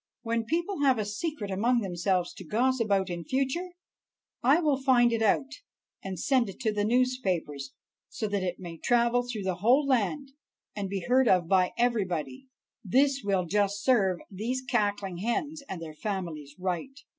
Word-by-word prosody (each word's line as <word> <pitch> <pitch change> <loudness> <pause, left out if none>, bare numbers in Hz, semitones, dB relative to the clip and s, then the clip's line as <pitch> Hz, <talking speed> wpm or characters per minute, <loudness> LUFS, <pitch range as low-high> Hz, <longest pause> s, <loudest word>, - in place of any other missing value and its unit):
When 230 -1 -1
people 340 - -1
have 265 -3 +4
a 215 - -1
secret 210 0 -4
among 235 +5 +2
themselves 180 -1 -1
to - - -10
gossip 240 +6 +1
about 195 -3 +1
in 170 -1 -4
future, 270 - -1 0.7
I 275 +7 +5
will 295 -5 +1
find 240 -3 +4
it 230 - 0
out, 245 +5 +2 0.5
and 190 -3 -5
send 255 -2 +2
it 195 - -10
to 220 -3 0
the 205 0 0
newspapers, 200 - 0 0.3
so 215 - -3
that 200 -1 -1
it 180 -1 -2
may 170 -3 -9
travel 240 0 +3
through 245 -4 -5
the 185 -2 -1
whole 250 +9 +4
land 270 +2 0 0.4
and 200 -2 -3
be 195 -2 -3
heard 255 +1 +4
of 180 -4 +3
by 185 0 +3
everybody. 235 - -1 0.4
"This 270 +7 +2
will 195 -3 +1
just 205 +2 0
serve 195 -8 +3
these 235 +7 -3
cackling 205 -6 -1
hens 285 - -2
and 190 - -4
their 160 -2 -7
families 160 -6 -5
right." 185 +9 -3
215 Hz, 170 wpm, -28 LUFS, 185-255 Hz, 0.7 s, I